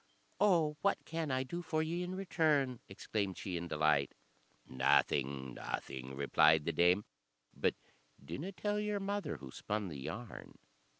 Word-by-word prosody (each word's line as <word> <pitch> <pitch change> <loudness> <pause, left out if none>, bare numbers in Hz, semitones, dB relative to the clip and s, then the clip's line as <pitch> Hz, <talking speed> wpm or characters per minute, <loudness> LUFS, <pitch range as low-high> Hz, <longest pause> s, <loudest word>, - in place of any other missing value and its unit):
"Oh, 170 -7 +3
what 200 - +1
can 165 -2 -3
I 130 0 +1
do 170 +7 -4
for 160 -1 0
ye 170 +2 -2
in 180 +1 -3
return?" 150 -9 +1
exclaimed 100 -1 -2
she, 95 -3 -4
in 85 0 -3
delight. 75 -3 +2 0.5
"Nothing 65 0 +2
nothing," 65 0 -5
replied 75 +2 +4
the 85 - +1
dame; 90 +6 +4 0.5
"but - - +1 0.5
dinna 145 - -4
tell 205 +3 -1
your 210 -1 -1
mother 200 +1 -2
who 65 -2 -10
spun 105 +4 -3
the 75 -4 -7
yarn." 110 - -7
115 Hz, 145 wpm, -35 LUFS, -, 0.5 s, replied